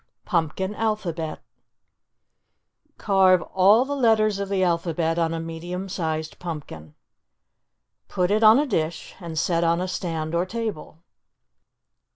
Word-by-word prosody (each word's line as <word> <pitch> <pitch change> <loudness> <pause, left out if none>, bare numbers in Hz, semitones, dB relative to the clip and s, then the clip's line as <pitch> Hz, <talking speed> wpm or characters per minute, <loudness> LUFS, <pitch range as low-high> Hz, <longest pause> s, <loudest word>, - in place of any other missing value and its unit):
PUMPKIN 180 +2 -1
ALPHABET 190 -8 -3 1.6
Carve 190 -3 +4
all 200 +6 +5
the 285 +1 -3
letters 215 -5 +2
of 200 -1 -3
the 195 -1 +1
alphabet 170 -1 0
on 165 -1 +1
a 165 - -3
medium 170 +3 -5
sized 160 -4 -4
pumpkin. 140 - -8 1.1
Put 180 +1 0
it 215 +1 +2
on 220 +1 +8
a 295 - +2
dish 165 - -3
and 170 -3 -7
set 170 +2 +1
on 170 0 +2
a 185 - -2
stand 165 -3 -3
or 175 +2 0
table. 210 -7 -5
180 Hz, 130 wpm, -24 LUFS, 165-200 Hz, 1.6 s, on